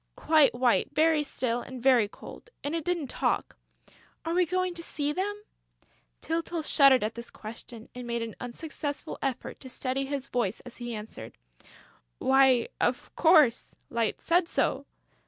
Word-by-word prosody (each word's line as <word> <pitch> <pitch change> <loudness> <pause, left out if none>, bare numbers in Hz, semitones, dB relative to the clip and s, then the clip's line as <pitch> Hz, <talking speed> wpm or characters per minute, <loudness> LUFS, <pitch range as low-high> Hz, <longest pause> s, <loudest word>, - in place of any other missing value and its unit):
"Quite 310 -5 +4
white, 245 -1 +2
very 315 0 +4
still 245 -4 -2
and 260 0 -8
very 245 -4 +4
cold; 345 - -12
and 285 - -2
it 330 -1 -1
didn't 345 -2 -1
talk...." 255 - -1 0.7
"Are 330 - -1
we 360 0 +3
going 365 +1 0
to 340 - -5
see 295 -3 -2
them?" 395 +5 -2 0.9
Tyltyl 330 0 -2
shuddered 275 -5 +5
at 215 +1 -1
this 235 +1 -8
question 225 +1 -10
and 250 -1 -7
made 235 -1 -1
an 225 -2 -6
unsuccessful 285 +3 -5
effort 265 -3 -3
to 260 - -10
steady 265 +1 -2
his 275 -1 -3
voice 235 -5 -1
as 245 -1 -11
he 240 -1 -5
answered: 210 - -9 0.8
"Why, 265 - +4
of - - -1
course, 310 -8 +4 0.2
Light 230 -2 0
said 345 0 +2
so!" - - 0
270 Hz, 155 wpm, -28 LUFS, 240-320 Hz, 0.9 s, shuddered